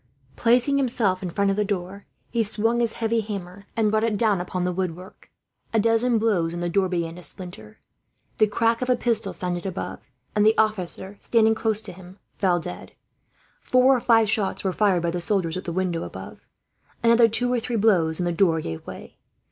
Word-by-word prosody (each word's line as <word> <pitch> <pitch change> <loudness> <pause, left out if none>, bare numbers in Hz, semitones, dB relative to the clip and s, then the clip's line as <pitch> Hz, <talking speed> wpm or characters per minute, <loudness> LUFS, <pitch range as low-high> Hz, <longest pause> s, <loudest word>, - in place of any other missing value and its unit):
Placing 245 +4 +3
himself 230 -8 +1
in 185 - -4
front 200 +3 +1
of - - 0
the 210 - +1
door, 200 0 -4 0.2
he 235 -2 +1
swung 225 +3 0
his 235 -2 0
heavy 230 0 0
hammer 200 -2 -7
and 215 -2 +2
brought 215 0 +1
it 225 -2 0
down 205 -4 +2
upon 180 0 -3
the 180 - 0
woodwork. 185 0 -6 0.4
A 225 - +3
dozen 230 +2 +2
blows, 195 -7 +1
and 175 - -4
the 175 - -1
door 190 0 +1
began 170 -2 -3
to - - -9
splinter. 170 - -6 0.6
The 215 - +5
crack 230 +3 +1
of 250 - -2
a 250 - +4
pistol 225 -4 0
sounded 175 -1 -2
above, 190 -1 -5 0.4
and 210 - +3
the 220 +1 +4
officer 200 -2 -1
standing 225 -1 +3
close 220 -1 0
to - - -8
him 185 +1 -14 0.2
fell 180 -3 +1
dead. 90 - -8 0.7
Four 255 +1 +4
or - - 0
five 225 -2 +4
shots 205 -2 -1
were 190 -2 0
fired, 190 -5 +2
by 170 - 0
the 175 0 -3
soldiers, 175 -4 0
at 185 - -5
the 170 - -3
window 175 -1 -1
above. - - -8 0.6
Another 230 0 +6
two 245 +3 0
or 245 - +1
three 235 +1 -4
blows, 185 -7 +2
and 175 - 0
the 175 - 0
door 170 -2 +2
gave 80 - -6
way. - - -10
200 Hz, 205 wpm, -24 LUFS, 180-225 Hz, 0.7 s, Another